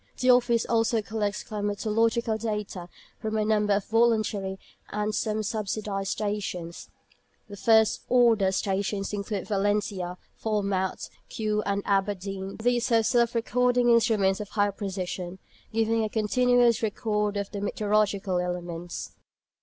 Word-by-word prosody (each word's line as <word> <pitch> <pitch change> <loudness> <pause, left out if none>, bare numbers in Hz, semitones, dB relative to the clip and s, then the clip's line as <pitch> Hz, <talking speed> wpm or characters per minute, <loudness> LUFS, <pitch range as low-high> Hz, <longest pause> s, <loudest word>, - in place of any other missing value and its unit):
The 255 0 +5
Office 240 -2 +3
also 225 -1 +1
collects 210 -1 -2
climatological 220 +2 0
data 210 -5 -4 0.3
from 220 0 -2
a 215 - +1
number 210 -1 +2
of 200 0 0
voluntary 215 -4 +1 0.3
and 210 +1 -2
some 215 0 -1
subsidised 205 -2 -3
stations. 200 -5 -4 0.6
The 205 - -9
"first 220 +1 +3
order" 230 -6 +4
stations 195 +1 -1
include 200 -1 -3
Valentia, 200 -3 -1 0.2
Falmouth, 200 -3 -1 0.2
Kew, 215 -1 -1
and 200 0 0
Aberdeen. 195 -1 -1
These 240 +2 +1
have 225 -2 +3
self 235 +1 +2
recording 245 +1 +2
instruments 220 -4 +3
of 210 -1 -6
high 205 -1 +1
precision, 185 -2 -5 0.3
giving 225 0 +1
a 215 - -1
continuous 240 +2 +3
record 210 -1 -1
of 200 -1 -3
the 200 - -5
meteorological 205 -2 0
elements. 175 -1 -5
210 Hz, 125 wpm, -27 LUFS, 195-225 Hz, 0.6 s, The